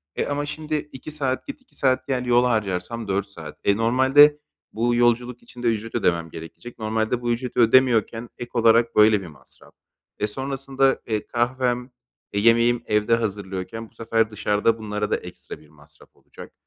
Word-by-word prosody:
E, - - -1
ama 145 0 -2
şimdi 155 +1 -4 0.2
2 135 +4 -9
saat 135 -4 -2
git 280 -2 -8
2 260 - -21
saat 130 0 +1
gel 125 -2 -1
yol 120 0 +4
harcarsam 110 -1 -2
4 100 +1 -1
saat. 100 - -11
E, 100 +1 +2
normalde 130 +6 +5 0.3
bu 120 +2 +1
yolculuk 120 0 +1
içinde 120 -1 -6
ücret 115 0 -2
ödemem 85 -2 0
gerekecek. 80 +10 -11
Normalde 110 +2 -1
bu 120 0 -1
ücreti 125 +1 -3
ödemiyorken 120 -1 +3
ek 120 0 -8
olarak 115 0 +3
böyle 105 -1 +5
bir 90 - -9
masraf 75 -4 -18 0.5
ve 105 - +1
sonrasında, 135 +2 -1
eee, 110 -2 -2
kahvem, 125 +1 -1 0.4
eee, 100 - 0
yemeğim 115 +2 +3
evde 105 +2 +2
hazırlıyorken 100 0 -5
bu - - -33
sefer 115 -1 0
dışarıda 105 +2 +1
bunlara 105 -1 -4
da - - +2
ekstra - - -10
bir - - -20
masraf - - -21
olacak - - -14
115 Hz, 170 wpm, -23 LUFS, 105-125 Hz, 0.5 s, normalde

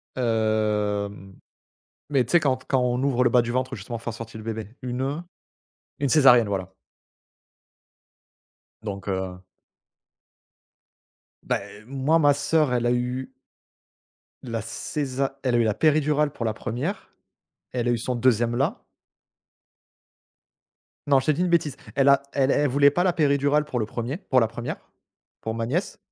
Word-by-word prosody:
Hem, 105 -4 -1 0.8
mais 135 -3 +3
tu 120 - -8
sais 175 - +6
quand 130 -4 0
quand 130 - +2
on 125 0 0
ouvre 135 -3 +2
le 120 - +4
bas 125 0 +5
du 120 0 -3
ventre, 130 +1 -1
justement 115 +4 -6
pour - - -17
faire 120 - -4
sortir 115 -1 -8
le 110 - -9
bébé, 110 0 -5
une, 125 0 -3
heu, 140 +3 -2 0.8
une 140 -1 0
césarienne, 125 -5 +6
voilà. 95 -2 -4 2.1
donc 100 -2 -6
heu, 95 -2 -3 2.0
Bah - - 0
eh 105 - -13
moi, 135 +6 +1
ma 145 -2 +5
sœur 150 -2 +1
elle 120 -1 0
a 120 - +3
eu 125 +2 -2 1.1
la 115 -3 -3
césa 135 +4 -3
elle 130 -2 +1
a - - +4
eu - - +4
la 110 -2 +1
péridurale 150 +1 +2
pour 115 - -5
la 110 - 0
première, 130 - -4 0.6
elle 120 -1 -2
a - - +3
eu 120 - +1
son 125 +2 -2
deuxième 120 -1 +2
là. 135 +3 -1 2.2
Non, 140 -2 +5
je - - -6
t'ai 155 - +3
dit 150 - -2
une 180 - +2
bêtise, 155 -5 +1 0.2
elle 140 0 +4
a 140 0 +5
elle 135 -1 +2
elle 145 - +2
voulait 140 +2 +5
pas 175 +5 +1
la 185 - +3
péridurale 145 -1 +2
pour 130 -4 -3
le 110 - 0
premier, 120 +6 -4
pour 130 -9 +2
la 115 - +3
première, 120 +2 -5 0.7
pour 110 0 -3
ma 115 0 -2
nièce. 165 - -2
125 Hz, 165 wpm, -25 LUFS, 115-140 Hz, 2.2 s, sais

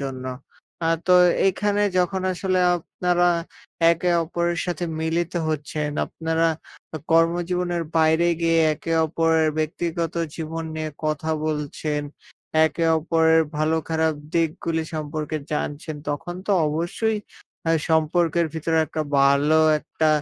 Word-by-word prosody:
জন্য। 130 -2 -5 0.6
আ - - +2 0.2
তো 180 - +4 0.3
এইখানে 205 +2 +1 0.2
যখন 185 +1 0
আসলে 185 0 -1 0.2
আপনারা, 175 +1 0 0.6
একে 170 +1 +1
অপরের 170 +1 -1
সাথে 175 0 -2 0.2
মিলিত 165 +2 -1 0.2
হচ্ছেন, 150 0 -2 0.2
আপনারা 165 0 0 0.5
আ - - -3
কর্মজীবনের 175 +1 +1
বাইরে 160 +2 +4
গিয়ে 165 0 +3 0.2
একে 165 +2 -5
অপরের 160 0 +2
ব্যক্তিগত 165 +1 -2 0.2
জীবন 165 0 -4
নিয়ে 155 -1 -3
কথা 155 +1 -1 0.2
বলছেন, 150 0 -2 0.6
একে 160 +2 0
অপরের 160 0 +3
ভালো 155 +1 +1
খারাপ 160 -1 +1 0.2
দিকগুলি 165 0 0
সম্পর্কে 155 0 -3 0.2
জানছেন 150 +1 -3
তখন 165 +4 -3
তো - - -1 0.2
অবশ্যই 175 +8 -1 0.5
আ - - +3 0.2
সম্পর্কের 165 +1 +2
ভিতরে 160 0 0
একটা 155 +1 -3
ভালো 140 +3 +4 0.2
একটা 155 +1 -1
160 Hz, 120 wpm, -23 LUFS, 155-170 Hz, 0.6 s, তো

